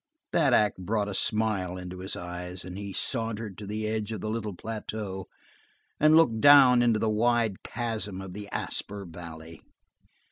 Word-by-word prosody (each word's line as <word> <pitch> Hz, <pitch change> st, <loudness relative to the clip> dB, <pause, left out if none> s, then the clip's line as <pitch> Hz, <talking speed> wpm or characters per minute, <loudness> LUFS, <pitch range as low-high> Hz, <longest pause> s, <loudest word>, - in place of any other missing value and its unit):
That 150 Hz, -5 st, +4 dB
act 105 Hz, -4 st, +3 dB
brought 105 Hz, +2 st, -1 dB
a -, -, -4 dB
smile 100 Hz, -4 st, 0 dB
into 90 Hz, 0 st, -7 dB
his 95 Hz, +1 st, -5 dB
eyes, 90 Hz, +1 st, -6 dB
and 90 Hz, 0 st, -7 dB
he 100 Hz, 0 st, -6 dB
sauntered 115 Hz, -2 st, -3 dB
to 105 Hz, -, -7 dB
the 110 Hz, +1 st, -3 dB
edge 110 Hz, 0 st, -2 dB
of 110 Hz, -, -4 dB
the 110 Hz, -, -2 dB
little 110 Hz, -3 st, -3 dB
plateau 105 Hz, -2 st, -5 dB, 0.7 s
and 155 Hz, +1 st, +6 dB
looked 115 Hz, -9 st, +4 dB
down 135 Hz, -4 st, +8 dB
into 120 Hz, -2 st, +3 dB
the 110 Hz, +1 st, 0 dB
wide 110 Hz, -1 st, +1 dB
chasm 110 Hz, -5 st, -3 dB
of 95 Hz, -1 st, -7 dB
the 100 Hz, +1 st, -7 dB
Asper 100 Hz, 0 st, -4 dB
Valley. 80 Hz, -1 st, -10 dB
105 Hz, 170 wpm, -28 LUFS, 95-115 Hz, 0.7 s, down